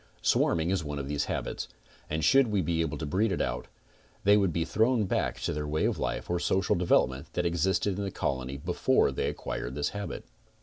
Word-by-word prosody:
Swarming 85 +1 +2
is 95 -4 0
one 75 -1 -4
of 70 -1 -4
these 75 0 -1
habits, - - -3 0.4
and 80 0 -2
should 135 - +5
we 105 -2 0
be 80 +1 0
able 80 -3 -2
to 80 - -4
breed 100 +9 +1
it 95 - -1
out, 60 +1 -2 0.6
they 100 +1 +6
would 100 -4 +3
be 80 0 -1
thrown 110 +4 +2
back. - - -1
to - - -1
their 75 0 -3
way 75 +1 0
of - - 0
life - - -2
or 90 0 0
social 95 +1 +1
development 70 -6 +1
that 90 - -1
existed 90 +3 +1
in - - -1
the 100 - -2
colony 65 -5 -3
before 70 - +2
they - - -1
acquired 65 +2 -5
this 75 - 0
habit. 100 0 -6
85 Hz, 215 wpm, -29 LUFS, 75-95 Hz, 0.6 s, they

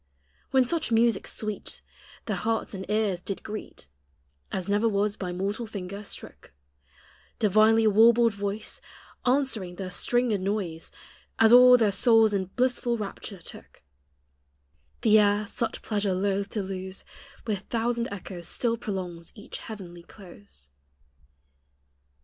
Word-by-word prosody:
When 265 -1 +4
such 315 -1 -1
music 230 0 +2
sweet 215 -1 -4 0.4
Their - - -1
hearts 225 -1 -1
and 190 0 -7
ears 210 -4 0
did 195 - -5
greet 215 - -7 0.6
As 185 -2 -3
never 205 +3 +2
was 205 0 0
by 180 -4 -4
mortal 200 +6 -3
finger 200 -1 -6
strook 200 - -8 0.8
Divinely 215 +2 +4
warbled 230 +2 +5
voice 200 +1 -5 0.5
Answering 245 -9 0
the 185 0 -6
stringed 240 -1 +1
noise, 185 -5 -3 0.5
As 225 +1 +6
all 250 0 +9
their 220 -4 +2
souls 220 +2 +4
in 195 -2 0
blissful 245 +3 0
rapture 200 -1 -6
took; - - -13 1.2
The 215 -1 +6
air, 205 0 +3
such 225 +2 -4
pleasure 205 -3 -1
loath 200 +1 -1
to 210 -1 -3
lose, 190 0 -6 0.4
With 210 -4 -1
thousand 235 +1 0
echoes 180 -3 -7
still 230 +3 0
prolongs 180 -6 -5
each 210 - -8
heavenly 180 -6 -9
close. 100 - -13
210 Hz, 125 wpm, -27 LUFS, 190-225 Hz, 1.2 s, all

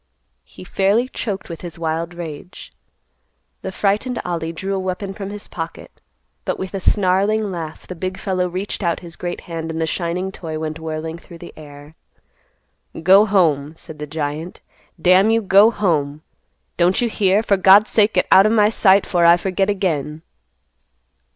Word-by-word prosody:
He - - -13
fairly 200 +6 +1
choked 200 -6 -5
with 170 -2 -8
his 170 -2 -8
wild 165 +1 -3
rage. 170 +1 -9 0.9
The 190 - -5
frightened 210 +6 -1
Ollie 165 -2 -3
drew 190 +4 -4
a 195 - -1
weapon 190 +1 -4
from 195 0 -7
his 205 0 -8
pocket, 165 -1 -8 0.4
but, - - -2
with 190 +1 -6
a 195 - -2
snarling 200 +2 +1
laugh, 165 -3 -7
the - - -7
big 185 +2 -5
fellow 185 -2 -1
reached 185 +5 -4
out 170 -3 -1
his 170 -2 -10
great 175 0 -5
hand 165 -1 -6
and 160 0 -4
the 160 - +1
shining 180 +3 -3
toy 160 -4 -6
went 155 0 -5
whirling 160 +1 -5
through 170 - -13
the 175 - -11
air. 145 0 -13 1.1
"Go 195 +5 +6
home," 160 -7 +1
said 155 -1 -12
the 150 - -5
giant. 155 +3 -5 0.4
"Damn 185 +5 +4
you, 225 0 +3
go 200 +1 +5
home! 155 -9 -1 0.5
Don't 180 +2 +3
you 240 - +1
hear? 205 -1 +1
For 205 - +2
God's 195 +2 +5
sake 215 0 +3
get - - +2
out 195 +2 +7
o' - - +2
my 215 -2 +4
sight 200 -3 +4
'fore 175 -2 +2
I 170 +1 +7
forget 190 +2 -1
again!" 160 -6 -2
180 Hz, 175 wpm, -20 LUFS, 160-195 Hz, 1.1 s, out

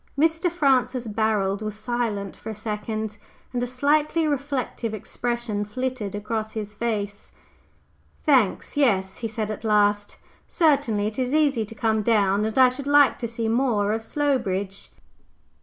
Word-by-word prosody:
Mr. 325 +4 +2
Francis 260 -6 +2
Barold 210 -2 0
was 215 -1 -4
silent 215 -3 -2
for 220 - -9
a 220 - -5
second, 215 0 -4 0.4
and 245 - -1
a 245 - -1
slightly 295 +5 +1
reflective 270 -5 -2
expression 235 0 -3
flitted 240 -2 -3
across 215 +1 -3
his 210 -1 -5
face. 205 -2 -3 0.9
"Thanks, 260 - +2
yes," 195 -10 +2
he 230 - -3
said 215 -1 -3
at 215 - -6
last. 205 -1 +2 0.3
"Certainly. 280 - +2
It 215 +4 -3
is 255 +3 0
easy 280 -8 +2
to 225 - -11
come 220 -1 +1
down, 205 -2 +2
and 220 +2 -3
I 260 -1 +7
should 270 +2 -6
like 285 -2 +5
to 235 - -2
see 230 0 -3
more 225 -3 +1
of 225 - -2
Slowbridge." 225 -8 -1
225 Hz, 150 wpm, -24 LUFS, 210-260 Hz, 0.9 s, I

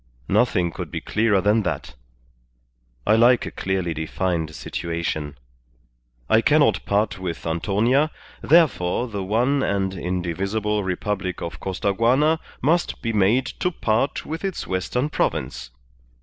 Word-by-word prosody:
Nothing 85 -1 +2
could - - -6
be - - -4
clearer 105 -3 +1
than 105 +3 +3
that. 100 - -3 1.1
I 110 - +4
like 120 +2 +5
a - - -5
clearly 95 -3 -2
defined 80 0 -2
situation. 80 -3 -4 0.9
I 110 - +4
cannot 145 -5 +3
part 100 -1 0
with 90 -3 -5
Antonia, 105 - +2 0.3
therefore 130 - +3
the 100 -4 -4
one 120 +8 +1
and 95 -4 0
indivisible 95 +4 -2
Republic 95 0 -2
of 85 - -6
Costaguana 115 - +1 0.2
must 170 +5 +1
be 115 -1 -1
made 105 +6 +3 0.2
to 180 - +2
part 120 -5 -1
with 160 +1 -5
its 195 -3 -3
western 110 +9 -1
province. - - -2
100 Hz, 125 wpm, -23 LUFS, 90-125 Hz, 1.1 s, like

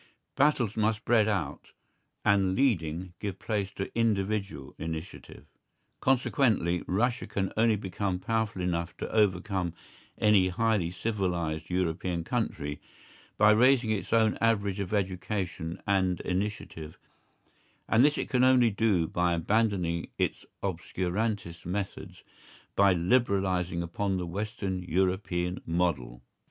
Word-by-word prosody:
Battles 135 -7 +2
must 110 0 +1
spread 110 -1 +3
out, 105 -3 -3 0.5
and 100 -2 +3
leading 90 - 0
give 100 -3 -4
place 105 -3 -2
to 100 - -5
individual 100 -8 -1
initiative. 80 -5 -7 0.5
Consequently 120 - +2
Russia 120 +6 0
can 95 -1 -2
only 110 0 +4
become 95 -1 -2
powerful 110 -1 -1
enough 85 -1 -2
to - - -5
overcome 95 -4 +1 0.4
any 105 -3 +4
highly 105 -2 +1
civilised 85 -5 -2
European 90 -1 -1
country 80 - -3 0.6
by 105 +1 +6
raising 125 +1 +4
its 105 -3 -2
own 110 -2 +3
average 105 -4 +1
of 100 -2 -3
education 95 -4 -2
and 95 -3 +1
initiative, 90 -5 -4 0.9
and 115 +3 +4
this 150 +1 +4
it - - -2
can 125 - +1
do 130 - +6
only 115 -8 +3
by 85 +1 0
abandoning 90 -2 0
its - - -2 0.2
obscurantist 95 +1 -2
methods, 95 +3 -5 0.5
by 100 0 +5
liberalising 95 -3 +1
upon 95 +3 -2
the 90 - -2
Western 100 +1 -3
European 90 0 -1
model. 70 -8 -1
95 Hz, 120 wpm, -29 LUFS, 90-110 Hz, 0.9 s, by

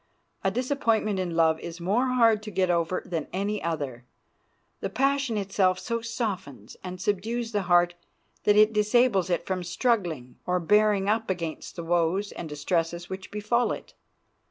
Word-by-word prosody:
A - - +3
disappointment 230 -6 0
in 175 -3 -2
love 160 -1 +3
is 170 0 -7
more 205 +9 +1
hard 230 -4 +4
to 215 - -7
get 185 -3 +1
over 170 +1 0
than 165 -4 -3
any 200 +2 -2
other; 140 -7 -3 0.8
the - - -3
passion 270 -3 +1
itself 195 -2 +1
so 230 +3 -3
softens 190 - -4
and 185 -1 -6
subdues 225 +5 -1
the 205 -2 0
heart 175 0 +5 0.5
that 205 - +4
it 215 +1 +6
disables 210 -2 +3
it 175 - 0
from 185 -1 -2
struggling 175 - -1
or 180 0 +2
bearing 205 +2 +3
up 220 +1 +1
against 170 -4 -4
the 170 - -5
woes 175 +4 +1
and 165 - -7
distresses 165 +4 -2
which 190 0 -6
befall 215 +4 0
it. - - -7
190 Hz, 160 wpm, -27 LUFS, 170-220 Hz, 0.8 s, it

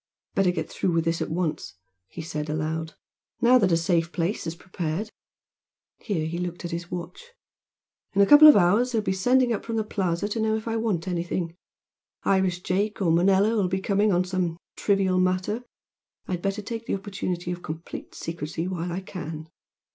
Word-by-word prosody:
"Better 195 -2 +3
get 180 - -2
through 180 - -1
with 165 -1 +1
this 165 0 0
at - - -2
once" 160 - -2 0.3
he 165 - -8
said, 150 -1 -4
aloud 160 +1 -2 0.4
"Now 250 +1 +6
that 195 -5 +3
a 165 - +4
safe 170 -1 +1
place 175 +1 -2
is 165 - -3
prepared." 180 +3 -4 0.9
Here 180 -8 -2
he 170 +2 -3
looked 175 0 -4
at 175 - -4
his 170 +1 -5
watch. 180 - -7 0.8
"In 200 - +4
a - - +6
couple 295 +6 +10
of 300 - +10
hours 205 +7 +4
they - - +1
will 215 - +1
be 190 - 0
sending 245 +5 +3
up 215 - -3
from 230 - -4
the 220 - +1
Plaza 190 -3 -1
to 225 - -2
know 220 0 +1
if 220 +1 -5
I 225 - -1
want 215 -6 -1
anything 170 -1 -2 0.7
Irish 190 -2 +1
Jake 205 +3 0
or 180 -5 +2
Manilla 195 +6 +4
will 200 -4 +2
be 190 +1 -1
coming 200 +2 +2
on 180 0 +3
some 180 -2 -2 0.2
trivial 195 -2 +2
matter 185 +5 0 0.7
I'd 180 -2 -2
better 195 +2 -2
take 230 +2 -6
the - - 0
opportunity 185 -3 -4
of 175 0 -5
complete 160 +1 -7
secrecy 165 +1 -4
while 175 -1 -3
I 180 +3 -3
can." 160 -4 -7
185 Hz, 195 wpm, -26 LUFS, 170-205 Hz, 0.9 s, couple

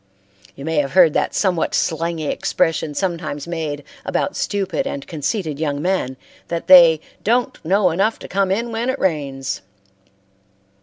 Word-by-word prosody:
You 140 - -9
may 160 -1 -1
have 140 -2 0
heard 175 -4 +6
the - - +2
somewhat 180 -5 0
slangy 165 -1 -1
expression 155 0 0
sometimes 170 -5 -3
made 155 -4 -4 0.2
about - - -1
stupid 205 +7 -1
and 280 0 -5
conceited 155 -1 -3
young 145 -3 -1
men, 155 -6 -1 0.3
that 170 -1 -3
they 170 -4 +8 0.2
"don't 240 +3 0
know 185 +2 +3
enough 200 +7 +1
to - - -10
come 195 0 0
in 230 +5 -1
when 230 +3 -2
it 260 - -1
rains." 140 - -2
170 Hz, 150 wpm, -20 LUFS, 150-195 Hz, 0.3 s, they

